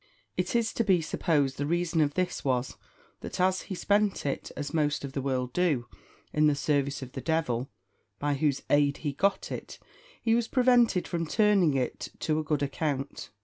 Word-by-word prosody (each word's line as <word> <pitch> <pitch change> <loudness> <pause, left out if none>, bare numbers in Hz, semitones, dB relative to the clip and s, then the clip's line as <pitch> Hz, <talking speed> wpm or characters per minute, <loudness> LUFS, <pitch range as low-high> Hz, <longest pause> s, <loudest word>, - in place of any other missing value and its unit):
It 180 +5 -1
is 230 -1 +1
to 230 - +1
be 190 -5 +4
supposed 150 -4 0
the 145 - -1
reason 170 0 +1
of 145 -1 +1
this 185 -1 -1
was, 125 -2 0 0.4
that - - -7
as 185 +1 +2
he 190 - -3
spent 205 0 +1
it, 140 - -3
as 145 +1 -4
most 150 -3 +1
of 135 - -8
the 135 - -2
world 130 -2 -1
do, 160 -9 +1 0.5
in 150 0 +4
the 150 - +3
service 140 -1 0
of 130 - -9
the - - -6
devil, 140 -6 -1 0.5
by 145 0 0
whose 140 -1 0
aid 145 -1 +3
he 145 - 0
got 195 +7 0
it, - - -6 0.4
he 225 - +1
was 235 0 +2
prevented 245 -7 +3
from 165 -2 -2
turning 200 -5 +3
it 130 -2 -2
to 155 -1 +1
a - - -1
good 150 -1 0
account. 140 -1 -3
155 Hz, 190 wpm, -28 LUFS, 140-185 Hz, 0.5 s, be